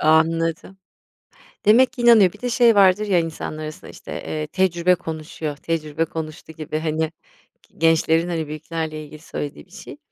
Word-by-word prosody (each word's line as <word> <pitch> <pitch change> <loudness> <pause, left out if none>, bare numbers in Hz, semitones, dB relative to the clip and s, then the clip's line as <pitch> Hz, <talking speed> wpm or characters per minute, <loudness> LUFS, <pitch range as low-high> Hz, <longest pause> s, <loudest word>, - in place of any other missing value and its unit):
A 155 - +1
anladım. 165 +3 +1 0.9
Demek 240 +6 +5
ki 255 - -6
inanıyor, 220 -6 +6
bir 210 - -17
de 250 - -2
şey 235 -1 +4
vardır 200 +1 +4
ya 180 -3 +3
insanların 155 -1 -5
arasında 155 0 -8
işte, - - -12
eee, 155 -1 -4
tecrübe 180 0 +2
konuşuyor, 155 -2 -6
tecrübe 160 0 -2
konuştu 160 0 -7
gibi, 155 0 -4
hani, 160 0 -1 0.6
gi - - -29
gençlerin, 165 +1 +3
hani, 160 -3 -2
büyüklerle 155 0 -5
ilgili 150 0 -12
söylediği 145 - -6
bir - - -29
şey. - - -11
165 Hz, 165 wpm, -22 LUFS, 155-185 Hz, 0.9 s, inanıyor